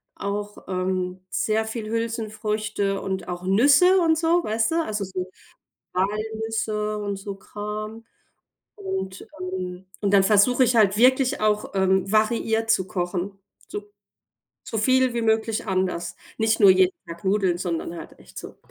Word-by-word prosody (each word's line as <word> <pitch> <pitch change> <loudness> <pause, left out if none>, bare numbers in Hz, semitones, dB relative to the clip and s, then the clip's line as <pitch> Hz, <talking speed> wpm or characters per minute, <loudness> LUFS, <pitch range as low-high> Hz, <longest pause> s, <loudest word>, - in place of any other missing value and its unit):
auch, 205 +1 -4
ähm, 185 0 -2
sehr 220 +3 0
viel 220 -1 -5
Hülsenfrüchte 215 -3 -2
und 190 -2 -4
auch 175 0 -5
Nüsse 280 - +5
und 325 -2 +3
so, 335 +1 +2
weißt 220 +3 0
du, - - 0
also, 210 -6 -3
so 185 -1 -5 0.6
Walnüsse 215 +2 -2
und 205 -1 -3
so 200 +1 -6
Kram 210 +3 -7 0.7
und, 380 - -5
ähm 185 0 -5
und 200 -1 0
dann 195 - +7
versuche 220 +6 +4
ich 245 -1 +2
halt 205 -3 +4
wirklich 260 +3 +4
auch, 210 0 0
ähm, 190 0 +2
variiert 225 +1 +1
zu 190 - +2
kochen, 185 +1 -3 0.3
so 415 0 -7 0.7
so 225 - -3
viel 255 +2 +3
wie 235 - -1
möglich 220 0 0
anders. 185 -3 -1 0.2
Nicht 220 0 +2
nur 200 -3 +8
jeden 185 0 +4
Tag 170 0 -9
Nudeln, 190 -3 +1
sondern 170 -2 -3
halt - - -10
echt - - -18
so - - -9
210 Hz, 150 wpm, -24 LUFS, 190-225 Hz, 0.7 s, nur